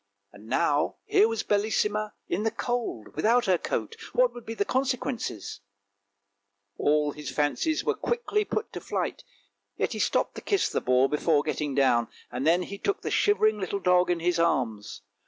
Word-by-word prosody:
Now 145 +8 0
here 215 - +4
was 225 -1 -2
Bellissima 210 0 0
in 185 - -1
the 225 - +1
cold 235 - -3
without 235 +2 +3
her 185 -3 +3
coat; 460 - -3 0.2
what - - +3
would 240 - -11
be 225 - -4
the 200 - 0
consequences? 255 - -2 1.2
All 150 0 +2
his 150 0 -7
fancies 155 - 0
were - - +1
quickly 475 -3 -1
put 435 +2 -4
to - - -6
flight, - - -3 0.5
yet - - -1
he - - -5
stopped - - +1
to - - -8
kiss 400 -2 +1
the - - -1
boar 130 +1 +3
before 150 0 +2
getting 150 -2 -2
down, 120 -4 +3 0.2
and 125 +4 -2
then 175 +2 +4
he 200 +2 -8
took 405 - -1
the - - -3
shivering 215 - +3
little 195 +1 -2
dog 180 -1 +3
in 175 -1 0
his 175 0 +1
arms. 120 -12 -1
185 Hz, 175 wpm, -27 LUFS, 150-235 Hz, 1.2 s, here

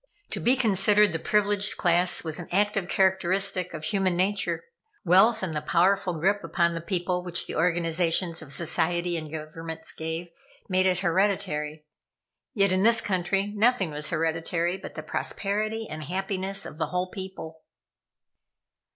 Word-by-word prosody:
To - - -3
be 250 +2 +3
considered 210 -4 +3
the 165 - -2
privileged 205 +2 +1
class 175 0 +2
was 160 0 -2
an 175 - -7
active 200 -1 +1
characteristic 190 0 +2
of 155 - -7
human 185 +1 0
nature. 200 +3 0 0.4
Wealth, 195 +5 +5
and 175 -4 -2
the 150 - -2
powerful 185 +3 +2
grip 195 +6 +1
upon 170 -1 +1
the 165 - -4
people 180 0 -1
which 175 -1 0
the - - -6
organizations 170 0 +1
of 150 -3 -9
society 170 +2 0
and 155 -2 -5
governments 160 +1 -6
gave, 160 +2 -5 0.4
made 185 0 +2
it 180 -1 +1
hereditary. 170 -5 0 0.7
Yet 200 -2 +3
in 185 0 +2
this 225 +2 +5
country, 195 0 -1
nothing 210 -5 +2
was 150 +1 -3
hereditary 165 +1 -1
but - - -9
the - - -6
prosperity 215 +2 -2
and 155 0 -7
happiness 195 +3 -2
of 155 - -9
the - - 0
whole 180 0 -2
people. 190 -5 -8
180 Hz, 150 wpm, -26 LUFS, 165-195 Hz, 0.7 s, Wealth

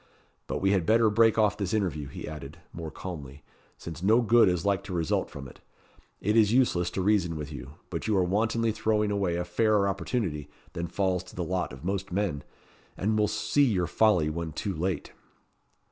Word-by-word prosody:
But - - -3
we 95 - +4
had 95 -4 +1
better 110 -1 +4
break 115 +1 +4
off 105 -3 +3
this 100 0 -1
interview," 85 -9 -1
he 70 - -8
added, 75 0 -8 0.2
more 80 -2 -6
calmly, 75 -5 -8 0.3
"since 85 0 -8
no 110 +5 +4
good 115 -2 +5
is 90 -1 -1
like 100 -1 +2
to 95 - -6
result 85 -3 0
from 70 -1 -8
it. - - -15 0.6
It 105 +3 +1
is 110 -2 +5
useless 115 -9 +2
to 95 - +1
reason 95 -5 +2
with 75 -1 -6
you; 70 0 -9 0.2
but 85 +3 -4
you 105 -2 +2
are 95 - +3
wantonly 110 +5 +1
throwing 110 -1 0
away 100 -4 0
a 90 0 -2
fairer 105 +3 +2
opportunity 90 - -2 0.2
than 85 +1 -3
falls 95 -1 0
to - - -14
the 90 - -2
lot 90 -1 -2
of 65 +6 -10
most 95 0 -2
men, 90 -6 -1 0.5
and 105 +3 0
will 105 -1 +3
see 105 +9 +1
your 95 -8 +1
folly 90 -2 +3
when 80 0 -4
too 95 +5 -3
late." 85 -1 -3
95 Hz, 200 wpm, -28 LUFS, 85-105 Hz, 0.6 s, good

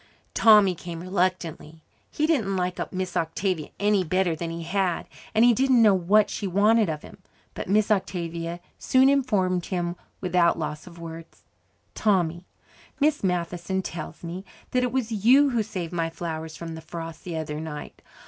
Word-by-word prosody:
Tommy 210 -4 +6
came 170 -1 -7
reluctantly. 175 -3 -2 0.3
He 300 - 0
didn't 230 -12 +1
like 180 0 -2
Miss 185 -1 -4
Octavia 165 0 -1
any 205 -1 +3
better 180 0 +1
than 165 +1 -4
he 165 0 -5
had, 180 0 -1 0.3
and 225 +2 +6
he 240 - +6
didn't 260 +1 +3
know 215 -3 +6
what 195 +3 +4
she 200 - -4
wanted 210 +2 +3
of 155 -1 -4
him. - - -13 0.3
But - - -6
Miss 215 +2 +3
Octavia 170 -3 -2 0.2
soon 260 +1 +4
informed 200 -10 +1
him 175 -2 -2 0.2
without 180 -2 +2
loss 155 0 -5
of 170 -1 -12
words. 165 0 -10 0.5
"Tommy, 175 -4 +1 0.5
Miss 300 -2 +2
Matheson 180 +1 -1
tells 165 -1 -7
me 175 +3 -6 0.3
that 250 - +2
it 250 -1 0
was 250 -3 -1
you 275 +4 +6
who 235 -2 +1
saved 180 -5 -5
my 165 -1 0
flowers 160 -1 -5
from 165 -1 -6
the 160 - -8
frost 165 0 -8
the 170 -3 -4
other 150 -1 -4
night. 155 -2 -7
180 Hz, 165 wpm, -25 LUFS, 165-210 Hz, 0.5 s, Tommy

